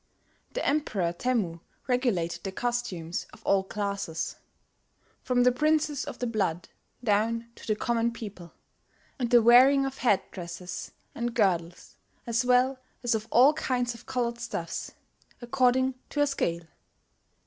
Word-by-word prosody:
the - - -2
Emperor 210 - 0
Temmu 190 -5 -1 0.3
regulated 240 -10 0
the 195 - -3
costumes 190 -8 -3
of - - -17
all 195 -1 +3
classes, 200 -5 -3 0.9
"from 245 -1 +2
the 250 - +5
Princes 300 +1 +1
of - - -7
the 245 - -2
Blood 190 -7 -1 0.3
down 230 +2 +1
to - - -14
the 215 - +2
common 235 +1 0
people, 200 -7 -9 0.7
and 245 -2 0
the 240 -2 +6
wearing 260 +4 +7
of 270 0 -5
headdresses 180 -5 -2 0.2
and 235 0 -3
girdles, 175 -6 0 0.3
as 235 0 +1
well 250 +1 +3 0.2
as 240 0 +2
of 220 0 -2
all 260 +7 +6
kinds 250 -5 -1
of 230 - -14
coloured 240 -2 -1
stuffs, 225 -8 -4 0.5
according 260 +1 +2 0.2
to - - -4
a - - +5
scale." 170 - -1
235 Hz, 135 wpm, -28 LUFS, 195-250 Hz, 0.9 s, wearing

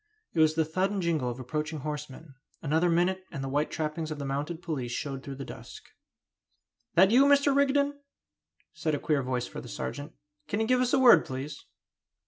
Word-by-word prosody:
It 165 - -1
was 155 0 +4
the 160 -1 +2
thud 185 +5 0
and 205 -1 -2
jingle 160 -8 0
of 120 +1 -6
approaching 150 +4 -3
horsemen. 150 0 -6 0.3
Another 160 +3 +1
minute 180 +3 +1
and 140 -4 -5
the - - -3
white 145 +3 0
trappings 155 0 -3
of 155 - -4
the 140 - -5
mounted 150 +5 -3
police 135 -9 -3
showed 135 +1 -4
through 140 0 -7
the 135 0 -7
dusk. - - -10 1.1
"That 190 +4 +6
you, 260 +4 +6
Mr. 280 0 +4
Rigden?" 280 +1 +2 0.7
said 165 -3 -1
a - - -3
queer 150 -1 +1
voice 125 -1 -2
for - - -8
the 120 - -11
sergeant. 145 +4 -5 0.3
"Can 205 - -2
you 220 - +1
give 255 +2 +3
us 250 +1 +1
a - - +5
word, 240 -11 +7
please?" 135 +3 -7
155 Hz, 200 wpm, -28 LUFS, 140-190 Hz, 1.1 s, word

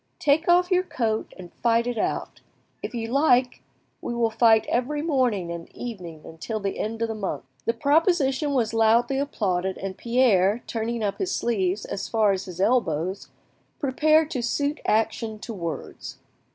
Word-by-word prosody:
Take 305 +3 +2
off 355 +1 +4
your 365 0 +4
coat 225 -11 -2
and 180 -2 -11
fight 235 0 +3
it 245 -2 -2
out. - - -3 0.4
If - - -5
you 225 -1 -3
like, 255 -2 +2 0.4
we 240 - -4
will 230 -1 +1
fight 225 -1 +4
every 290 +5 -1
morning 245 - 0
and 170 -1 -7
evening 170 -9 -8
till 220 +5 -3
the 195 -1 -3
end 225 +1 -2
of - - +1
the 225 - -3
month." 195 -9 -4 0.2
The 230 - +1
proposition 290 - +2
was 230 -4 +1
loudly 230 +4 +3
applauded, 190 -9 -1
and 195 0 -5
Pierre, 230 -3 +2
turning 230 0 -3
up 200 -1 -2
his 370 -1 -1
sleeves 200 -4 -1
as 195 - -4
far 220 -3 +3
as 190 -1 -2
his 180 -1 -9
elbows, 190 -5 0 0.5
prepared 310 +3 +2
to 255 - -2
suit 285 +5 -1
actions 220 0 0
to 230 - -6
words. 170 -7 -6
230 Hz, 165 wpm, -25 LUFS, 200-265 Hz, 0.5 s, off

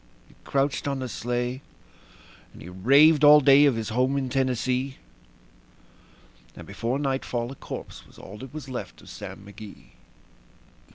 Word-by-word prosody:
He - - -22
crouched 140 +1 -1
on 140 -1 -1
the 130 -1 -4
sleigh, 120 +2 -3 0.9
and - - -14
he 90 - -10
raved 140 - +4
all 150 +1 +9
day 140 +1 +6
of 135 - +2
his 115 -1 -4
home 130 +4 0
in 135 -2 -2
Tennessee; 130 0 -1 1.6
And - - -11
before 120 +3 -3
nightfall 135 -3 -2
a - - -9
corpse - - -9
was - - -20
all 100 +2 -11
that 130 0 -10
was 150 -2 -8
left 130 -2 -7
of - - -14
Sam 100 - -9
McGee. 100 0 -13
130 Hz, 155 wpm, -25 LUFS, 120-140 Hz, 1.6 s, all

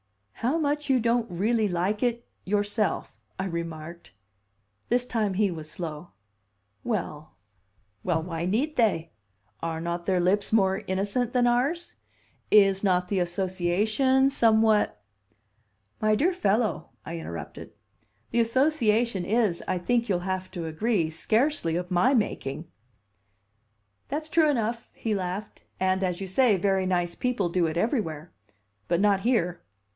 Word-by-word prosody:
"How 250 - 0
much 295 -2 -1
you 260 -2 +4
don't 235 0 +1
'really 215 +5 +1
like 185 +4 -1
it' 240 -1 -1 0.2
yourself!" 205 +1 -1 0.2
I 190 - -2
remarked. 170 - -6 0.8
This 245 +1 +2
time 215 -6 -1
he 200 -1 +2
was 155 -2 -7
slow. 160 0 -7 0.7
"Well 155 - -4 0.7
well 165 -3 0
why 165 -1 -4
need 270 +11 0
they? 195 - +1 0.5
Are 165 -1 -3
not 170 +1 -4
their 185 -2 +2
lips 190 +3 +1
more 195 -2 +2
innocent 205 +6 -1
than 250 -1 +3
ours? 270 +8 0 0.5
Is 195 -2 +5
not 180 -2 +2
the 195 0 0
association 195 +9 +1
somewhat 220 - +3 0.5
?" 105 -1 -42
"My 215 0 +3
dear 340 - +2
fellow," 210 - 0 0.2
I 165 +1 -5
interrupted, 85 - -8 0.6
"the 235 - +1
association 235 - +2
is, 210 -3 +1
I 185 - 0
think 235 +6 0
you'll 180 -3 +2
have 185 0 -3
to 175 -3 -5
agree, 165 +1 0
scarcely 220 - +1
of 180 +1 -3
my 235 +10 +3
making!" 155 - -2 1.4
"That's 310 +3 -4
true 315 -2 +4
enough," 230 -3 -1
he 225 - -2
laughed. 190 +2 -4 0.2
"And, 190 0 +1
as 180 -2 -1
you 195 - -4
say, 210 +2 +3
very 190 0 +1
nice 175 -2 0
people 245 -8 -1
do 170 -1 +1
it 160 +1 -3
everywhere. 175 - -1 0.6
But 170 0 +1
not 200 -1 +3
here. 195 -6 0
195 Hz, 140 wpm, -26 LUFS, 175-235 Hz, 1.4 s, Is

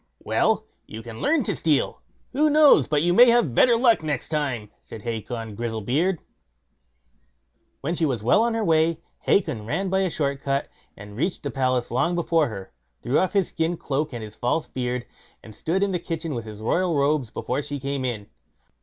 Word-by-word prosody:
"Well, - - +1 0.2
you 110 +1 -8
can 115 -1 -9
learn 310 -3 +2
to - - -1
steal; 155 -4 0 0.3
who 305 +3 +3
knows 295 - +6
but 150 0 +1
you 175 0 +3
may 245 +6 +8
have 235 - +3
better 235 - +5
luck 230 -4 +4
next 150 -5 -3
time", 130 -9 -2
said 110 - -11
Hacon 115 -1 -4
Grizzlebeard. 120 - -1 1.6
When 155 +5 -2
she 165 -2 +1
was 120 -6 -2
well 120 - +4
on 230 0 +1
her 225 - 0
way, 160 0 +2 0.2
Hacon 125 - +1
ran 185 +9 -1
by 190 - +2
a 190 -1 +1
short 140 -3 -2
cut, 140 0 -1 0.3
reached 105 - -4
the 140 - -3
palace 130 -1 0
long 170 +9 +1
before 165 -3 +2
her, 100 -4 -8 0.3
threw 130 - +2
off 185 - 0
his 195 -3 +2
skin 165 +1 -1
cloak 150 +1 -2
and 110 -4 -7
false 125 +8 -1
beard, 125 -1 -3 0.4
and 110 -2 -12
stood 180 - -1
in 200 - 0
the 180 - -1
kitchen 165 -2 -4
with 115 -3 -4
his 105 -1 -9
royal 175 +9 +1
robes 140 -3 +1
before 125 +5 -3
she 145 0 -5
came 140 0 -3
in. 115 -5 -3
145 Hz, 190 wpm, -24 LUFS, 120-175 Hz, 1.6 s, may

